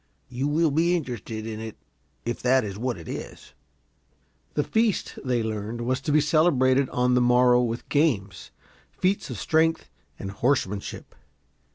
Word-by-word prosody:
You 130 +3 -2
will 155 +1 +2
be 170 +4 +2
interested 115 - -5
in 110 -1 -5
it, 110 -1 -7 0.5
if 120 0 -3
that 130 0 +3
is 100 -2 -5
what 120 +1 -2
it 85 - -11
is." - - -8 1.0
The 150 - +2
feast, 220 +2 0
they 125 -3 0
learned, 110 +1 -4
was 130 +2 -1
to 150 - -2
be 150 - +5
celebrated 140 -4 +3
on 125 0 +1
the 125 - +4
morrow 125 0 +5
with 120 -1 -3
games, 110 - 0 0.4
feats 190 +2 -1
of - - -5
strength 160 - +1 0.3
and 95 - -6
horsemanship. 105 -3 -2
125 Hz, 155 wpm, -25 LUFS, 110-150 Hz, 1.0 s, be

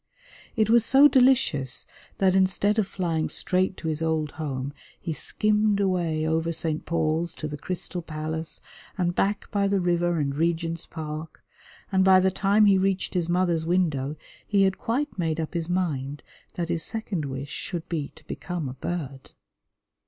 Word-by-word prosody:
It 220 -3 +3
was 230 0 +5
so 270 +5 +7
delicious 250 - +3 0.3
that 190 -1 +3
instead 190 +3 +2
of 205 - +1
flying 165 -5 -1
straight 185 +1 0
to 160 - -5
his 155 0 -1
old 160 -2 0
home 140 -3 -4 0.3
he 165 - -3
skimmed 210 +6 +1
away 175 -5 +1
over 165 +1 +1
St. 160 -1 -3
Paul's 165 0 0
to 155 - -4
the 150 - -5
Crystal 180 +3 -5
Palace 155 0 -4 0.4
and 175 -2 +1
back 200 +3 -1
by 200 -2 +2
the 200 0 +2
river 175 -1 +1
and 140 -2 -1
Regent's 165 +1 -1
Park, 155 -1 -7 0.5
and 190 -1 +4
by 190 0 +7
the 190 0 +3
time 200 +3 +3
he 195 -2 +5
reached 195 0 0
his 175 -2 0
mother's 175 -2 +2
window 155 -6 +1 0.3
he 200 -2 +3
had 190 0 +1
quite 265 0 -2
made 165 -1 0
up 160 - -3
his 170 -1 -2
mind 145 -6 -2 0.3
that 170 -1 -3
his 170 -1 0
second 200 -6 -2
wish 135 +1 -5
should 175 -4 -5
be 155 -5 -3
to - - -18
become 175 -5 -4
a 125 - -5
bird. 140 -2 -5
170 Hz, 170 wpm, -26 LUFS, 155-190 Hz, 0.5 s, so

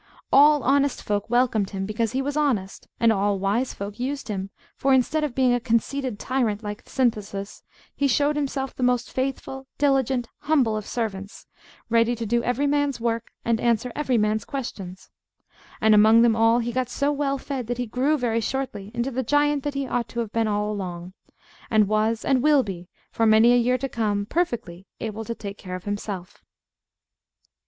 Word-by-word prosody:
All 295 +1 +6
honest 275 +1 +2
folk 205 +1 -2
welcomed 240 -5 +2
him, 195 -1 -4
because 220 +3 -2
he 265 +1 0
was 285 +1 -3
honest; 250 -11 -1
and 230 -1 +4
all 200 0 +1
wise 205 +7 -1
folk 200 +3 -7
used 270 0 -3
him, 195 -2 -3 0.3
for, 270 -1 +3
instead 305 +5 +1
of 285 -5 -3
being 255 -2 +3
a 245 - +2
conceited 245 +1 -1
tyrant 230 -4 -1
like 210 0 -5
Synthesis, 210 -6 -2 0.3
he 280 - +1
showed 290 +3 +2
himself 270 -2 -2
the - - -7
most 250 -1 +1
faithful, 265 0 -4
diligent, 265 -4 +1
humble 270 -8 +2
of 215 -1 -5
servants, 200 -4 -4 0.4
ready 230 +1 +2
to 230 0 -4
do 235 +2 +1
every 250 +4 0
man's 285 -2 +1
work, 230 -1 -2 0.2
and 230 -1 +1
answer 235 +1 +1
every 265 -5 +1
man's 215 0 +1
questions. 190 -8 -7 0.7
And 220 0 +4
among 220 +2 +6
them 230 -2 +4
all 225 +1 +4
he 240 0 -1
got 255 0 -1
so 280 +3 0
well 280 -1 -1
fed 265 -3 -5
that 245 0 -2
he 250 - -2
grew 260 +7 +1
very 230 -3 0
shortly 220 -5 -3
into 240 +3 -1
the 260 +1 -1
giant 290 +3 +2
that 290 0 -4
he 275 0 -1
ought 245 -2 -2
to 235 - -5
have 220 -3 -5
been 225 -1 +1
all 210 0 0
along; 180 -3 -6 0.6
and 215 -2 +4
was, 215 +2 0
and 265 -2 +2
will 295 -1 +4
be 180 -4 -7 0.2
for 225 - +1
many 220 +2 +6
a - - +5
year 245 +1 +2
to 270 +2 -3
come, 210 -5 -1
perfectly 215 - -2
able 220 0 -4
to 230 +1 -5
take 200 -2 -8
care 185 -2 -6
of 185 - -8
himself. 205 -2 -5
235 Hz, 190 wpm, -24 LUFS, 210-265 Hz, 0.7 s, All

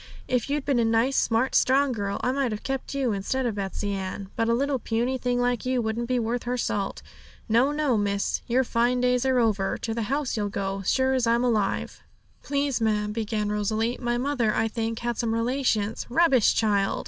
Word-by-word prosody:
If 250 +1 0
you'd 290 -1 -1
been 275 -4 +2
a - - +3
nice, 230 +4 +2
smart, 230 +3 +1
strong 270 +1 +3
girl, 200 -4 -3
I 250 - +2
might 270 -2 0
have 210 - -5
kept 270 +1 -4
you 265 -4 +1
instead 215 +6 -1
of 235 - 0
Betsey 200 0 -3
Ann; 195 0 -5
but 230 0 0
a - - +3
little 275 +1 0
puny 240 +4 -1
thing 245 0 0
like 245 -1 0
you 255 0 0
wouldn't 230 +1 -2
be 255 0 +1
worth 235 +1 -1
her 250 +1 -1
salt. 200 -4 -2 0.4
No, 240 +5 +3
no, 295 -5 +1
miss; 200 -1 -1
your 255 +2 +2
fine 240 +1 +1
days 250 +1 +2
are 260 -1 +2
over; 210 -5 +1
to 225 - -3
the 230 - -2
house 280 -1 -1
you'll 205 -2 -1
go, 195 0 -3
sure 260 +7 +2
as 255 -3 +1
I'm 235 +1 +3
alive.' 215 -5 -1 0.4
'Please, 280 -3 -1
ma'am,' 210 -1 +1
began 215 -1 -2
Rosalie, 215 +3 -1
'my 240 -1 0
mother, 245 -4 0
I 225 - +1
think, 225 0 -3
had 240 -1 -2
some 225 -1 0
relations' 230 -3 0
'Rubbish, 265 -4 +4
child!' 205 -3 +1
235 Hz, 205 wpm, -26 LUFS, 215-255 Hz, 0.4 s, Rubbish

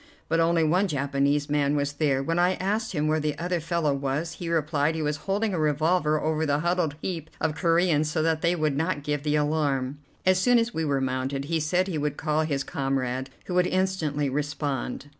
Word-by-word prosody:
But 165 +1 +1
only 165 0 +3
one 180 +6 +2
Japanese 140 -1 0
man 145 0 +1
was 145 0 -1
there. 140 -2 +1
When 165 +4 0
I 180 +1 +3
asked 215 +4 -1
him 150 -2 0
where 155 +1 +2
the 150 -1 -2
other 175 +1 -1
fellow 165 -2 0
was, 140 +4 -2
he 170 -1 -6
replied 155 -1 +1
he 160 - -2
was 150 0 -1
holding 205 +1 +1
a 175 - -1
revolver 155 +1 +2
over 155 +1 0
the 145 -1 +1
huddled 175 -3 0
heap 165 -4 -4
of 155 - 0
Coreans 165 -2 +2
so 155 +1 0
that 160 -1 +1
they 175 0 +2
would 155 -4 0
not 160 -1 -1
give 145 -1 -1
the 150 0 0
alarm. 145 -3 0 0.3
As 185 0 +4
soon 245 +5 +4
as 230 0 +1
we 160 - -1
were 140 -3 0
mounted, 130 +1 -2
he 165 +2 0
said 180 +5 +1
he 165 -5 -2
would 145 0 -2
call 155 -1 0
his 145 -3 -1
comrade, 135 -1 -2 0.2
who 180 - -5
would 180 0 +3
instantly 170 -6 0
respond. 145 -1 -3
155 Hz, 215 wpm, -26 LUFS, 145-170 Hz, 0.3 s, As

